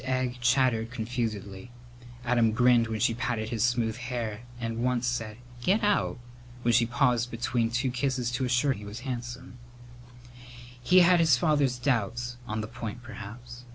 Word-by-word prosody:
Egg 130 Hz, -1 st, -1 dB
chattered 120 Hz, -2 st, +2 dB
confusedly. 110 Hz, -3 st, -4 dB, 0.6 s
Adam 120 Hz, -2 st, +3 dB
grinned 120 Hz, 0 st, +4 dB
when 110 Hz, -1 st, -3 dB
she 120 Hz, 0 st, +2 dB
patted 115 Hz, -2 st, -2 dB
his 115 Hz, -2 st, -1 dB
smooth 120 Hz, -2 st, +1 dB
hair 120 Hz, -4 st, -4 dB, 0.2 s
and 115 Hz, 0 st, -3 dB
once 125 Hz, -1 st, +1 dB
said 115 Hz, -3 st, -2 dB, 0.2 s
"Get 200 Hz, -, +2 dB
out!" 205 Hz, -9 st, +1 dB, 0.5 s
when 120 Hz, -, +3 dB
she 115 Hz, 0 st, +4 dB
paused 120 Hz, -2 st, +1 dB
between 115 Hz, 0 st, -1 dB
two 125 Hz, +2 st, 0 dB
kisses 125 Hz, -1 st, -1 dB
to 125 Hz, +2 st, -2 dB
assure 125 Hz, +3 st, +2 dB
him 105 Hz, -, -10 dB
he 105 Hz, -, -9 dB
was 105 Hz, +4 st, -7 dB
handsome. 125 Hz, 0 st, -6 dB, 1.2 s
He 180 Hz, +8 st, +6 dB
had 175 Hz, 0 st, +5 dB
his 160 Hz, -6 st, +5 dB
father's 145 Hz, -3 st, +2 dB
doubts 120 Hz, -1 st, -1 dB
on 110 Hz, -1 st, -2 dB
the 105 Hz, -, -5 dB
point 115 Hz, 0 st, -7 dB
perhaps. 120 Hz, +1 st, -9 dB
120 Hz, 160 wpm, -28 LUFS, 115-125 Hz, 1.2 s, He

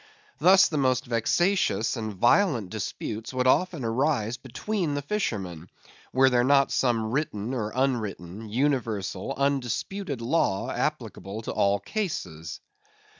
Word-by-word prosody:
Thus 185 Hz, +5 st, +7 dB
the 155 Hz, -, -2 dB
most 130 Hz, -2 st, +1 dB
vexatious 120 Hz, -, +1 dB
and 110 Hz, -2 st, -4 dB
violent 120 Hz, -, +2 dB
disputes 110 Hz, +2 st, -5 dB
would 125 Hz, 0 st, +1 dB
often 165 Hz, 0 st, +2 dB
arise 120 Hz, -1 st, 0 dB
between 155 Hz, -, -3 dB
the 145 Hz, -, -3 dB
fishermen, 95 Hz, -, -3 dB, 0.4 s
were 130 Hz, +1 st, +5 dB
there 120 Hz, -1 st, +3 dB
not 140 Hz, +1 st, +4 dB
some 115 Hz, -4 st, +1 dB
written 130 Hz, -5 st, -2 dB
or 110 Hz, -4 st, -2 dB
unwritten, 110 Hz, -6 st, -2 dB
universal, 115 Hz, -7 st, -1 dB
undisputed 140 Hz, -, -1 dB
law 115 Hz, -6 st, 0 dB
applicable 100 Hz, +3 st, -3 dB
to -, -, -4 dB
all 100 Hz, 0 st, +2 dB
cases. 90 Hz, -, -4 dB
125 Hz, 125 wpm, -26 LUFS, 105-145 Hz, 0.4 s, Thus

